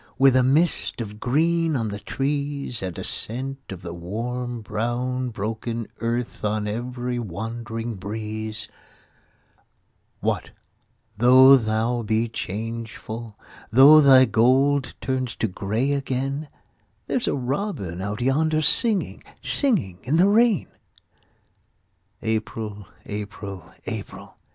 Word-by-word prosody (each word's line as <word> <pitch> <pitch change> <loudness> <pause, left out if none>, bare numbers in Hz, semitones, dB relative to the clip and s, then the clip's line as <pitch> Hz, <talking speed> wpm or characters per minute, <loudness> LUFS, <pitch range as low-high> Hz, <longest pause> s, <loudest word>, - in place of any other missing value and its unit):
With 135 -1 +5
a 130 - +6
mist 145 +5 +1
of 105 -2 -6
green 165 +5 +1
on 115 -4 -1
the 100 0 -5
trees 140 -2 -2
And 90 -3 -5
a - - -5
scent 135 +4 -3
of 95 -2 -8
the 85 -2 -6
warm 120 +7 -4
brown 120 +4 -2
broken 115 +1 -4
earth 120 +1 -3
On 105 0 -1
every 120 +2 -3
wandering 115 +2 -5
breeze; 110 +2 -5 1.5
What, - - -1 0.7
though 130 +3 +8
thou 115 0 0
be 110 +1 0
changeful, 115 +1 -6 0.3
Though 140 +6 +9
thy 135 -2 +7
gold 130 +4 +2
turns 130 -3 -2
to 115 - 0
grey 110 +8 -1
again, 135 +1 -2 0.6
There's 250 - -1
a - - +1
robin 125 - -3
out 105 +3 -4
yonder 155 +4 +2
singing, 215 +3 +2 0.2
Singing 165 - +1
in 145 +6 0
the 180 +3 +5
rain. 225 -1 +3 1.6
April! 110 -2 -3 0.2
April! 100 -2 -7
April! - - -7
120 Hz, 110 wpm, -24 LUFS, 110-135 Hz, 1.6 s, Though